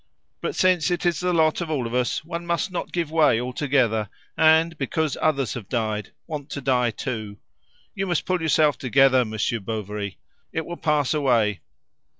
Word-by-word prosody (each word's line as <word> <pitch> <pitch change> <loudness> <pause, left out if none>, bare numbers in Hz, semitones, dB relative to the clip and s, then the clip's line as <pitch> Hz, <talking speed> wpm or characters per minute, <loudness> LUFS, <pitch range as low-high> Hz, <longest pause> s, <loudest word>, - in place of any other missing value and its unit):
But 455 - -3
since 185 -2 +3
it 175 0 -1
is 175 -1 +2
the 180 0 0
lot 160 -1 +2
of 170 - -4
all 140 -6 -1
of 115 - -5
us, 125 +5 0
one 170 +1 -5
must 170 +4 -1
not 180 - -4
give 170 -3 -2
way 155 -8 +4
altogether, 125 -4 0 0.3
and, 160 +1 +4
because 150 +1 -1
others 140 -8 +1
have 110 -5 -8
died, 110 -3 -2
want 150 -3 -6
to 145 - -4
die 125 -2 +2
too. 110 -3 -5 0.6
You 195 -1 -3
must 175 -3 0
pull 185 -2 0
yourself 155 -2 +3
together, 130 0 +4
Monsieur 110 +1 -2
Bovary. 105 -1 -5 0.3
It 160 -1 -3
will 175 - -6
pass 150 -3 +1
away. 120 -9 +2
140 Hz, 175 wpm, -24 LUFS, 115-160 Hz, 0.6 s, way